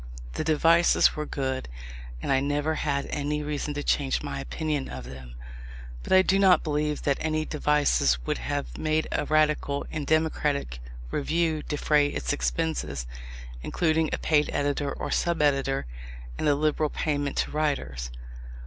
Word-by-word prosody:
The -, -, -2 dB
devices 165 Hz, +2 st, +4 dB
were 150 Hz, 0 st, -4 dB
good, 130 Hz, -, -3 dB, 0.5 s
and -, -, -1 dB
I 135 Hz, -, +4 dB
never 145 Hz, +3 st, 0 dB
had 140 Hz, -2 st, -1 dB
any 150 Hz, +1 st, -1 dB
reason 150 Hz, 0 st, -3 dB
to 145 Hz, -, -3 dB
change 135 Hz, -2 st, +1 dB
my 70 Hz, 0 st, -4 dB
opinion 140 Hz, -, -3 dB
of 65 Hz, -1 st, -7 dB
them. 65 Hz, -1 st, -10 dB, 0.7 s
But -, -, -8 dB
I 185 Hz, 0 st, +7 dB
do 195 Hz, +1 st, +2 dB
not 185 Hz, -4 st, +5 dB
believe 150 Hz, 0 st, -1 dB
that 140 Hz, -1 st, +1 dB
any 155 Hz, 0 st, 0 dB
devices 145 Hz, -, +2 dB
would -, -, -1 dB
have -, -, -4 dB
made 155 Hz, 0 st, +1 dB
a -, -, 0 dB
radical 150 Hz, -2 st, +1 dB
and 150 Hz, -2 st, -4 dB
democratic 150 Hz, -, 0 dB, 0.3 s
review 160 Hz, +1 st, 0 dB
defray 150 Hz, 0 st, +2 dB
its 145 Hz, -, -2 dB
expenses, 145 Hz, -, -2 dB, 0.6 s
including 160 Hz, -, +1 dB
a -, -, 0 dB
paid 150 Hz, -1 st, +2 dB
editor 145 Hz, 0 st, 0 dB
or -, -, -4 dB
sub 170 Hz, -1 st, +1 dB
editor, 135 Hz, -, +1 dB, 0.5 s
and -, -, -1 dB
a 145 Hz, -, +4 dB
liberal 155 Hz, +1 st, +1 dB
payment 145 Hz, -2 st, -2 dB
to -, -, 0 dB
writers. 70 Hz, -, -2 dB
150 Hz, 155 wpm, -27 LUFS, 140-155 Hz, 0.7 s, I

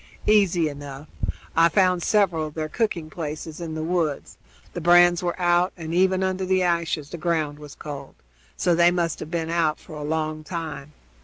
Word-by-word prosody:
"Easy 190 Hz, -6 st, +4 dB
enough. 145 Hz, 0 st, -8 dB, 0.5 s
I 165 Hz, +1 st, +6 dB
found 185 Hz, -1 st, +3 dB
several 175 Hz, -6 st, +2 dB
of 150 Hz, -, -12 dB
their 155 Hz, -1 st, -2 dB
cooking 185 Hz, -6 st, -1 dB
places 155 Hz, 0 st, -6 dB
in 160 Hz, -2 st, -5 dB
the 155 Hz, -, -3 dB
woods; 165 Hz, -4 st, -2 dB, 0.3 s
the 175 Hz, -, -4 dB
brands 175 Hz, +1 st, +6 dB
were 175 Hz, 0 st, -2 dB
out, 175 Hz, +1 st, +3 dB
and 165 Hz, -1 st, -5 dB
even 185 Hz, +1 st, +3 dB
under 190 Hz, 0 st, -1 dB
the 185 Hz, 0 st, +2 dB
ashes 170 Hz, -4 st, -1 dB
the 170 Hz, -, -6 dB
ground 155 Hz, -3 st, -1 dB
was 150 Hz, -2 st, -11 dB
cold, 140 Hz, -2 st, -8 dB, 0.4 s
so 175 Hz, -, +2 dB
they 170 Hz, +1 st, +5 dB
must 170 Hz, -2 st, -1 dB
have -, -, -7 dB
been 165 Hz, -1 st, -2 dB
out 165 Hz, -3 st, +1 dB
for 165 Hz, -, -13 dB
a 150 Hz, -, -6 dB
long 155 Hz, 0 st, -2 dB
time. 155 Hz, -4 st, -6 dB
165 Hz, 185 wpm, -24 LUFS, 155-175 Hz, 0.5 s, I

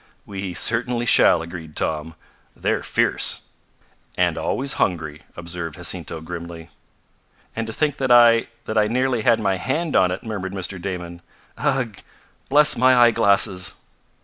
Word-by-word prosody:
"We 95 Hz, -3 st, -6 dB
certainly 120 Hz, +5 st, 0 dB
shall," 85 Hz, -7 st, +4 dB
agreed 85 Hz, -2 st, -9 dB
Tom. 80 Hz, +1 st, -2 dB, 0.4 s
"They're -, -, -1 dB
fierce." -, -, 0 dB, 0.8 s
"And -, -, +2 dB
always 135 Hz, +1 st, 0 dB
hungry," 80 Hz, -5 st, -1 dB, 0.2 s
observed 85 Hz, -2 st, -6 dB
Jacinto 85 Hz, -2 st, -3 dB
grimly. 85 Hz, 0 st, -8 dB, 0.8 s
"And 115 Hz, 0 st, -3 dB
to 110 Hz, -, -6 dB
think 145 Hz, +2 st, -1 dB
that 130 Hz, -2 st, -1 dB
I 120 Hz, -1 st, +6 dB, 0.2 s
that 110 Hz, 0 st, 0 dB
I 105 Hz, -, +3 dB
nearly 125 Hz, +1 st, 0 dB
had 115 Hz, 0 st, +3 dB
my 95 Hz, -3 st, 0 dB
hand 150 Hz, -, -2 dB
on 90 Hz, -, +4 dB
it," 90 Hz, -, -5 dB
murmured 100 Hz, -4 st, -5 dB
Mr. 95 Hz, -1 st, -5 dB
Damon. 90 Hz, -2 st, -6 dB, 0.4 s
"Ugh! 130 Hz, -8 st, -1 dB, 0.5 s
Bless 150 Hz, +2 st, +5 dB
my 130 Hz, +1 st, +4 dB
eyeglasses!" 100 Hz, -6 st, +3 dB
100 Hz, 140 wpm, -21 LUFS, 85-120 Hz, 0.8 s, I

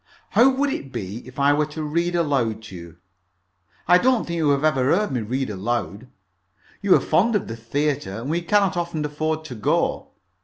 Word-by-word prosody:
"How 255 Hz, -, +5 dB
would 275 Hz, +2 st, 0 dB
it 135 Hz, -, -5 dB
be 95 Hz, -1 st, -5 dB
if 130 Hz, -, -13 dB
I 140 Hz, +1 st, +4 dB
were 150 Hz, 0 st, +1 dB
to 155 Hz, +1 st, -6 dB
read 170 Hz, +3 st, -1 dB
aloud 135 Hz, -10 st, 0 dB
to 110 Hz, -4 st, -10 dB
you? 85 Hz, 0 st, -11 dB, 0.9 s
I 180 Hz, -, +6 dB
don't 250 Hz, 0 st, +2 dB
think 170 Hz, 0 st, -4 dB
you 155 Hz, -3 st, +2 dB
have 140 Hz, 0 st, +2 dB
ever 155 Hz, -4 st, +2 dB
heard 180 Hz, +6 st, +2 dB
me 125 Hz, -3 st, -1 dB
read 125 Hz, +3 st, -2 dB
aloud. 105 Hz, +2 st, -3 dB, 0.7 s
You -, -, +5 dB
are -, -, +4 dB
fond 225 Hz, +4 st, +2 dB
of 205 Hz, -, -1 dB
the 115 Hz, -, -5 dB
theatre, 115 Hz, -2 st, -2 dB
and 120 Hz, -, -6 dB
we 165 Hz, +4 st, 0 dB
cannot 195 Hz, +1 st, +2 dB
often 170 Hz, -3 st, -2 dB
afford 155 Hz, +1 st, -2 dB
to 135 Hz, -, -7 dB
go. 110 Hz, -3 st, 0 dB
150 Hz, 200 wpm, -23 LUFS, 120-170 Hz, 0.9 s, I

